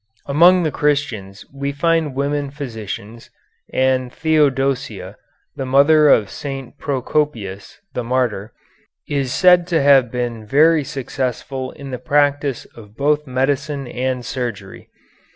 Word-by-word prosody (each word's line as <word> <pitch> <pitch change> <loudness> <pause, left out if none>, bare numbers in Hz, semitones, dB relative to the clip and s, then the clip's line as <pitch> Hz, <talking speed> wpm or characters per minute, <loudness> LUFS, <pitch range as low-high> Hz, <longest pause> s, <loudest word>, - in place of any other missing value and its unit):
Among 175 +5 +5
the 155 - 0
Christians 120 -11 -2
we 140 0 -3
find 160 -1 0
women 140 +1 -1
physicians, 115 -5 -7 0.4
and 130 -1 +1
Theodosia, 140 -4 0 0.4
the 135 - -4
mother 145 +3 +5
of 105 -7 +3
St. 135 -3 -7
Procopius, 125 -8 -2 0.2
the 125 - -3
martyr, 115 -4 -1 0.6
is 135 -3 -1
said 180 +2 +5
to 170 -3 +1
have 140 -4 +5
been 120 -3 -3
very 155 +7 +4
successful 130 -1 -4
in 140 -2 -9
the 125 - -4
practice 145 -3 +1
of 110 -1 -14
both 150 +1 +1
medicine 135 +2 -1
and 125 0 -3
surgery. 120 -4 -6
135 Hz, 120 wpm, -19 LUFS, 125-145 Hz, 0.6 s, Among